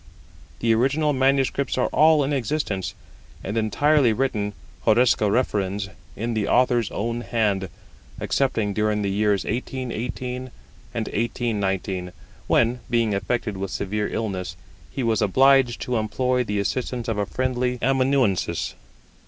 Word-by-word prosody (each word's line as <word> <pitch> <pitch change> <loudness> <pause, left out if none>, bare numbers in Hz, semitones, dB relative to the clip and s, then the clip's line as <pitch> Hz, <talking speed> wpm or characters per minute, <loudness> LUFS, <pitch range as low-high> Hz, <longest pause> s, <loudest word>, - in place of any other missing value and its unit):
The 115 -1 +3
original 145 +6 +2
manuscripts 135 0 +1
are 125 - +2
all 155 -1 +5
in 140 +2 -1
existence, 125 -7 -2 0.5
and 100 - -4
entirely 130 +3 +3
written 110 -5 -1 0.3
(horresco 110 -2 +4
referens) 100 -4 0 0.3
in 115 +3 -2
the 105 -2 -1
Author's 120 -3 +3
own 115 +2 -3
hand, 105 -6 0 0.5
excepting 110 -7 0
during 105 0 0
the 100 - 0
years 105 0 +1
1818 125 +1 -4 0.5
and - - -1
1819, 95 -5 -2 0.3
when, 120 +1 +2
being 115 -3 +2
affected 105 0 -2
with 95 0 -3
severe 105 +3 -2
illness, 95 -5 -3 0.3
he 135 - -4
was 115 -2 +1
obliged 130 +4 +4
to 125 -1 -1
employ 125 +4 0
the 105 -3 -2
assistance 120 +3 -2
of 110 -2 -1
a 100 - 0
friendly 125 +2 -1
amanuensis. 130 -9 +1
115 Hz, 130 wpm, -24 LUFS, 105-130 Hz, 0.5 s, all